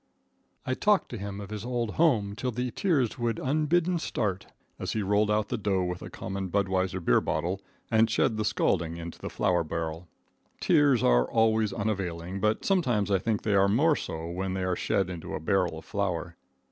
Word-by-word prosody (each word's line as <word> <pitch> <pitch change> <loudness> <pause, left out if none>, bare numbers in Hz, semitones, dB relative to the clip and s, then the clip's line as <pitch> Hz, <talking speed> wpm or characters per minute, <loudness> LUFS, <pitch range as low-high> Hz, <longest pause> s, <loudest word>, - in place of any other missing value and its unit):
I 130 - 0
talked 205 +8 +2
to 120 - -5
him 100 0 -5
of 100 0 -8
his 105 -1 -5
old 120 -2 -2
home 110 -12 +2
till 125 +3 -2
the 125 +1 -2
tears 135 - 0
would 115 -2 0
unbidden 160 +5 +1
start, 95 - -2 0.3
as - - -3
he 110 - -1
rolled 105 +2 +2
out 105 -1 +1
the - - -2
dough 95 -3 +1
with 90 0 -3
a - - -7
common 95 0 -5
Budweiser 95 -1 0
beer 70 -9 +3
bottle, 90 +5 -2 0.3
and 110 0 +4
shed 110 0 +2
the 110 - -1
scalding 85 -5 0
into 85 0 -8
the - - -5
flour 90 -2 +1
barrel. 80 +1 -4 0.5
Tears 140 -6 +4
are - - +4
always 110 -2 +2
unavailing, 95 -3 -3
but 105 +2 0
sometimes 120 - +1
I 95 - +3
think 110 +1 -1
they 105 - +1
are 100 0 +5
more 145 +9 +4
so 80 - -5
when 95 +2 -3
they 95 - -2
are 90 -1 0
shed 95 +1 0
into 90 -3 -6
a - - -3
barrel 90 0 0
of 80 - -10
flour. 90 -4 -2
100 Hz, 195 wpm, -28 LUFS, 90-115 Hz, 0.5 s, are